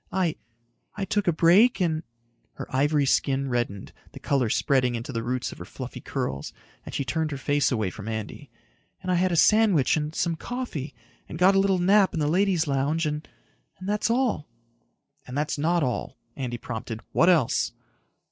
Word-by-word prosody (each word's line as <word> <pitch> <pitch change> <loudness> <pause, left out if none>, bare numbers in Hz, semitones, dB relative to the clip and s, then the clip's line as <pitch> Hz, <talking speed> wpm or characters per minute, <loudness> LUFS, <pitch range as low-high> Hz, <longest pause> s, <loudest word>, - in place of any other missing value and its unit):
"I... 180 -4 0 0.6
I 195 0 -3
took 205 0 -1
a - - +5
break 180 +10 +5
and...." 160 -4 0 0.5
Her - - -7
ivory 145 +1 +2
skin 135 0 +1
reddened, 120 -6 -3 0.2
the - - -9
color 135 -5 +1
spreading 125 0 +2
into 120 +4 -5
the 115 - -2
roots 125 +2 -2
of - - -11
her - - -6
fluffy - - -8
curls, 70 +1 -4 0.3
and - - -8
she 140 - -1
turned 160 +2 -1
her 140 - -4
face 145 +1 +1
away 110 -7 0
from 110 +2 -9
Andy. 110 -2 -5 0.5
"And 185 - -1
I - - +3
had 180 +1 +2
a - - +1
sandwich 205 - +4
and 150 +1 -3
some 170 -1 0
coffee 200 - -5 0.3
and 160 - -6
got 185 +3 +5
a 195 - +4
little 195 -1 +3
nap 190 +2 +4
in - - -1
the 150 - +1
ladies' 180 0 +2
lounge 145 +3 0
and... 150 0 -3 0.5
and 185 - -8
that's 210 +1 0
all." 235 - 0 0.8
"And 125 +2 -5
that's 150 0 -1
not 170 +2 +2
all," 125 -2 -3 0.2
Andy 125 -3 -4
prompted. 115 -1 -6
"What 170 - +4
else?" 160 -10 +2
155 Hz, 185 wpm, -26 LUFS, 130-185 Hz, 0.8 s, a